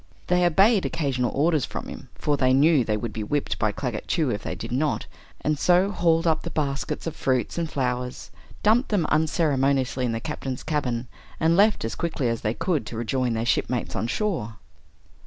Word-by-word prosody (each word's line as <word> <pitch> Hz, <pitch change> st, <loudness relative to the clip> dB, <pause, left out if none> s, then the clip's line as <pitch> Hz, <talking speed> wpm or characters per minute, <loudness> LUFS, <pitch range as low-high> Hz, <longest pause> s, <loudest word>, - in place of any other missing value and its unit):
They 180 Hz, 0 st, +2 dB
obeyed 195 Hz, +4 st, +4 dB
occasional 130 Hz, -6 st, -1 dB
orders 155 Hz, 0 st, +2 dB
from -, -, -5 dB
him, -, -, -9 dB
for 145 Hz, -, 0 dB
they 130 Hz, -2 st, +3 dB
knew 145 Hz, 0 st, +5 dB
they 110 Hz, -1 st, 0 dB
would 110 Hz, 0 st, -4 dB
be 110 Hz, -, -4 dB
whipped 145 Hz, +7 st, -2 dB
by 110 Hz, -1 st, +2 dB
Claggett 120 Hz, 0 st, -4 dB
Chew 155 Hz, -7 st, +1 dB
if 105 Hz, -, -3 dB
they -, -, -4 dB
did 115 Hz, -, -7 dB
not, 145 Hz, +4 st, 0 dB, 0.4 s
and 150 Hz, -1 st, 0 dB
so 180 Hz, +4 st, +4 dB
hauled 165 Hz, -4 st, +2 dB
up 160 Hz, -2 st, +2 dB
the 170 Hz, -, -5 dB
baskets 150 Hz, -1 st, -2 dB
of 165 Hz, -, -4 dB
fruits 130 Hz, -2 st, 0 dB
and 165 Hz, -2 st, -2 dB
flowers, 125 Hz, -2 st, -3 dB, 0.3 s
dumped 225 Hz, +5 st, +3 dB
them 200 Hz, -7 st, +1 dB
unceremoniously 140 Hz, -5 st, +1 dB
in 120 Hz, -, 0 dB
the 115 Hz, -, -2 dB
Captain's 135 Hz, -1 st, -5 dB
cabin, 125 Hz, -6 st, -2 dB, 0.3 s
and 165 Hz, +1 st, +3 dB
left 205 Hz, -, +3 dB
as 115 Hz, -, -3 dB
quickly 155 Hz, -7 st, -1 dB
as 115 Hz, -1 st, -2 dB
they 110 Hz, +2 st, -1 dB
could 165 Hz, -3 st, -1 dB
to 115 Hz, -, -6 dB
rejoin 120 Hz, +1 st, 0 dB
their 115 Hz, 0 st, -1 dB
shipmates 125 Hz, 0 st, 0 dB
on 110 Hz, -, -1 dB
shore. 160 Hz, -, -2 dB
140 Hz, 195 wpm, -25 LUFS, 125-165 Hz, 0.4 s, knew